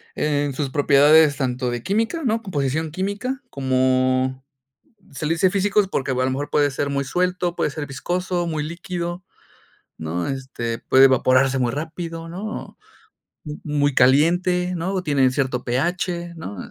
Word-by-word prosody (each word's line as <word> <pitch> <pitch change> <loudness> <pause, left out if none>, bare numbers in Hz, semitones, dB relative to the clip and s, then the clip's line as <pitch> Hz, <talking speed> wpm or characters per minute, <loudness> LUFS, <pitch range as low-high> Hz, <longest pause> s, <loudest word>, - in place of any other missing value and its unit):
en 145 -1 0
sus 135 0 -2
propiedades 145 +1 +5
tanto 125 -2 -1
de 120 -1 -4
química, 225 - -1
¿no? 225 -1 +1
Composición 155 - -2
química, 200 - -3
como 130 0 +1 0.7
se 150 +3 -4
le 165 - +2
dice 185 +3 +3
físicos 200 +1 +2
porque 135 -7 -2
o 130 - -1
a - - +2
lo 130 - +1
mejor 145 +2 -4
puede 145 -1 +2
ser 140 +1 -2
muy 140 0 -1
suelto, 180 +3 -1
puede 150 - 0
ser 145 0 -5
viscoso, 175 +5 -2
muy 155 -2 -2
líquido, 175 +1 -5 0.7
¿no? 80 +2 -3
Este, 130 -4 -4
puede 135 +1 +5
evaporarse 130 0 +3
muy 120 -2 0
rápido, 165 +2 -5
¿no? 200 +6 -6 0.7
Mu 150 -1 -7
muy 145 -2 +1
caliente, 175 +7 +3
¿no? 175 +4 -2
O 185 -1 -2
tienen 140 -5 +2
cierto 130 -3 -1
pH, 170 +6 -2
¿no? 100 -10 -7
150 Hz, 160 wpm, -22 LUFS, 130-180 Hz, 0.7 s, propiedades